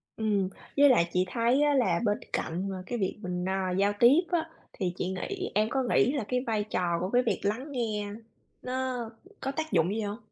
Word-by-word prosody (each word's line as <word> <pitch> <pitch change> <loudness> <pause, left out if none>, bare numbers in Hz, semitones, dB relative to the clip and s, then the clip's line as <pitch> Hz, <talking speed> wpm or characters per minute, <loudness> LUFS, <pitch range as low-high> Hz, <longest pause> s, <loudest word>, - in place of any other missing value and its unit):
Ừm, 205 -4 0 0.3
với 285 0 +7
lại 170 -9 +4
chị 180 0 +2
thấy 240 +4 +2
á 295 -1 +3
là 195 -11 +2
bên 210 0 +2 0.2
cạnh 180 +5 -2
mà 190 -1 -5
cái 245 - -3
việc 190 +1 -1
mình, 180 0 -3
à, 190 -1 -1
giao 200 +2 +2
tiếp 270 +8 +7
á, 330 -1 0 0.2
thì 180 -3 -2
chị 180 - -1
nghĩ 185 -1 -4
em 215 +1 +3
có 265 +1 0
nghĩ 250 +1 +3
là 280 -7 -1
cái 250 - +1
vai 215 -2 +1
trò 175 -4 -1
của 185 +2 -2
cái 245 +2 +3
việc 230 - 0
lắng 240 +9 -2
nghe 210 -5 -2 0.5
nó 255 0 -2 0.5
có 270 - -1
tác 315 -1 -4
dụng 170 -2 +3
gì 225 - -1
hông? 205 +1 -3
210 Hz, 220 wpm, -29 LUFS, 185-255 Hz, 0.5 s, với